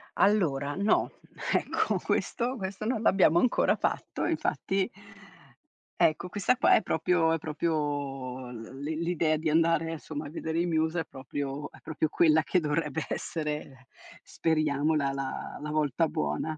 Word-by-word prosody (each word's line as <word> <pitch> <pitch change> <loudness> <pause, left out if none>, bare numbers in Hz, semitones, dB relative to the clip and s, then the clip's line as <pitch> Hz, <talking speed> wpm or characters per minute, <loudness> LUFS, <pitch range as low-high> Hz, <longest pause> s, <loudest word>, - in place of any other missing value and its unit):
Allora 150 -9 +2
no, 200 +3 +2 0.4
ecco - - +1
questo 245 +2 0
questo 195 +1 -5
non 225 -1 0
l'abbiamo 185 -5 +5
ancora 250 - +3
fatto - - -2
e - - 0
infatti 195 +3 0 1.1
Ecco, 160 +3 +2
questa 205 +6 +1
qua - - +5
è - - +4
proprio 165 -1 +2
è 165 - 0
proprio 145 -5 -2
l 120 +3 -9
l'i 155 +2 -2
l'idea 165 -2 +1
di 155 +1 -1
andare, 165 +1 +2
insomma, 155 -2 -6
a - - -8
vedere 160 +1 -2
i 175 - +1
Muse 160 0 +1
è - - -6
proprio 140 +1 -5
è - - -17
proprio 155 0 -1
quella 160 0 +4
che 180 +3 +1
dovrebbe 150 0 -1
essere 150 -5 -4 0.4
speriamo 155 -1 +1
la 140 -2 +1
la 135 -1 -4
la 150 - -4
volta 155 +1 +1
buona. 75 - -2
155 Hz, 150 wpm, -29 LUFS, 145-170 Hz, 1.1 s, l'abbiamo